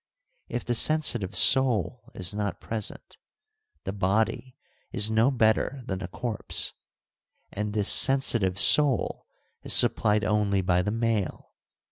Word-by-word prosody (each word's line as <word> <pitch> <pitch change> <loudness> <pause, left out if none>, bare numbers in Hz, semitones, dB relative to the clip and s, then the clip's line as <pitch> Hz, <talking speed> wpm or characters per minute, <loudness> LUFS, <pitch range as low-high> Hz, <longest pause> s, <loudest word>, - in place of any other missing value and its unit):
If 120 - -6
the 120 - -2
sensitive 120 -7 +1
soul 125 -4 +2
is 90 +1 -2
not 105 -1 -4
present, 110 -2 -5 0.7
the 95 - -5
body 110 +6 -2 0.3
is 110 -2 +2
no 110 +4 +2
better 125 +1 0
than 95 -1 -5
a 95 - -6
corpse, 110 +3 -4 0.8
and 105 0 -5
this 105 -1 -2
sensitive 115 -8 +3
soul 140 +4 +3 0.3
is - - -1
supplied 105 0 +1
only 105 -2 0
by 90 -1 0
the 100 - -3
male. 115 -3 -3
110 Hz, 125 wpm, -25 LUFS, 100-120 Hz, 0.8 s, sensitive